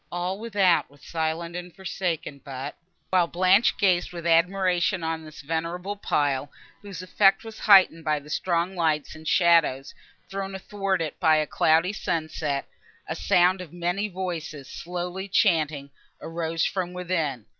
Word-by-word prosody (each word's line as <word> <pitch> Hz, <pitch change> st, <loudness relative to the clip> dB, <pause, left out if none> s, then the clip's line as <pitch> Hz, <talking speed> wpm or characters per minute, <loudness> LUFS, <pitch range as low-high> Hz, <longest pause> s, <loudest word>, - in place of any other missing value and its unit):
All 180 Hz, +3 st, -3 dB
without 200 Hz, -6 st, +2 dB
was 145 Hz, 0 st, -21 dB
silent 165 Hz, +1 st, -3 dB
and 180 Hz, -1 st, -7 dB
forsaken; 175 Hz, -7 st, -4 dB
but, 135 Hz, +1 st, -6 dB, 0.4 s
while 180 Hz, -2 st, +4 dB
Blanche 185 Hz, +6 st, +3 dB
gazed 185 Hz, -3 st, +2 dB
with 170 Hz, -1 st, -8 dB
admiration 180 Hz, +1 st, +2 dB
on 160 Hz, 0 st, -2 dB
this 155 Hz, -1 st, -11 dB
venerable 165 Hz, +6 st, -3 dB
pile, 145 Hz, -7 st, 0 dB, 0.3 s
whose 195 Hz, -4 st, -8 dB
effect 195 Hz, +3 st, +3 dB
was 225 Hz, -1 st, -10 dB
heightened 190 Hz, -5 st, +6 dB
by 155 Hz, -1 st, +1 dB
the 145 Hz, +1 st, -10 dB
strong 175 Hz, +2 st, 0 dB
lights 155 Hz, -4 st, 0 dB
and 155 Hz, 0 st, -11 dB
shadows 165 Hz, -7 st, +3 dB, 0.3 s
thrown 195 Hz, 0 st, -5 dB
athwart 195 Hz, -2 st, -2 dB
it 155 Hz, -, -6 dB
by 160 Hz, -3 st, +5 dB
a 155 Hz, 0 st, +2 dB
cloudy 165 Hz, +6 st, +2 dB
sunset, 155 Hz, -6 st, -2 dB, 0.4 s
a 160 Hz, -, -3 dB
sound 185 Hz, 0 st, +3 dB
of 175 Hz, -4 st, -9 dB
many 175 Hz, +4 st, -1 dB
voices, 170 Hz, -7 st, -5 dB
slowly 180 Hz, +4 st, -5 dB
chanting, 155 Hz, -8 st, +1 dB, 0.3 s
arose 165 Hz, 0 st, -2 dB
from 180 Hz, -2 st, -2 dB
within. 165 Hz, -, -2 dB
170 Hz, 145 wpm, -25 LUFS, 160-185 Hz, 0.4 s, heightened